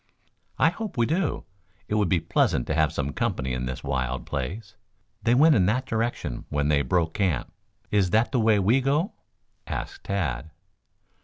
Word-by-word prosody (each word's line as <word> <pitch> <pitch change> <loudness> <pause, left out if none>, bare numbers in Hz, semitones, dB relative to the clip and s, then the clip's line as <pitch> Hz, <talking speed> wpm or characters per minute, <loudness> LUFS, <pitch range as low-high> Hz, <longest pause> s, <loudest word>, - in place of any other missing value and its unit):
"I 155 - +5
hope 205 - -6
we 120 - +3
do. 165 +4 -1 0.4
It - - -3
would 105 -4 +2
be 90 - +3
pleasant 60 - +1
to - - -2
have - - +2
some 70 0 -3
company 65 -1 -1
in 65 0 -2
this 65 - -5
wild 65 -2 -2
place. 95 - -5 0.5
They 120 +3 +3
went 155 +4 +6
in 95 -8 +3
that 125 +6 +1
direction 115 - -2
when 75 0 0
they 70 -1 +3
broke 85 0 0
camp. 90 - -1 0.4
Is 100 -3 +3
that 110 +5 +2
the 130 - +1
way 110 -1 +4
we 110 +7 +3
go?" 150 - +1 0.5
asked - - -5
Tad. 80 -8 -2
100 Hz, 175 wpm, -26 LUFS, 70-120 Hz, 0.5 s, went